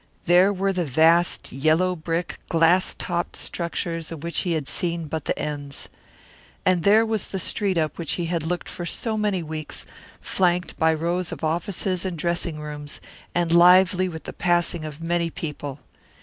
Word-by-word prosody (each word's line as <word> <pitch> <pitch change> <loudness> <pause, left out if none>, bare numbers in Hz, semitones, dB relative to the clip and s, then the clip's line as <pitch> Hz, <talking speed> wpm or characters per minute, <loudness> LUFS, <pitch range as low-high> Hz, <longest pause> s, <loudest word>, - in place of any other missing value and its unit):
There 180 +3 +5
were 195 0 0
the 180 -1 0
vast 165 +4 +3
yellow 155 +7 +2
brick, 165 +1 -3
glass 170 +3 +3
topped 175 -1 -3
structures 170 -1 -4
of 160 -2 -7
which 170 0 -1
he 175 - 0
had 155 -4 -2
seen 170 -2 0
but 155 0 -4
the - - -1
ends. 145 -2 -5 0.8
And 185 -2 +3
there 210 +5 +5
was 220 -3 -1
the 195 - -4
street 190 +1 0
up 155 -1 -1
which 165 - -1
he 175 - -2
had 170 0 -1
looked 175 +3 -3
for 175 - -6
so 220 +6 -3
many 205 -4 0
weeks, 155 -1 -6 0.3
flanked 180 -1 0
by 160 0 +4
rows 170 +2 -1
of - - -7
offices 180 +3 -1
and 185 -3 -3
dressing 170 -1 -2
rooms, 150 -1 -7 0.4
and 170 -1 +2
lively 180 +1 +6
with 160 -2 -8
the - - -7
passing 175 -2 +1
of 155 0 -8
many 170 0 0
people. 145 -3 -6
170 Hz, 175 wpm, -24 LUFS, 160-180 Hz, 0.8 s, lively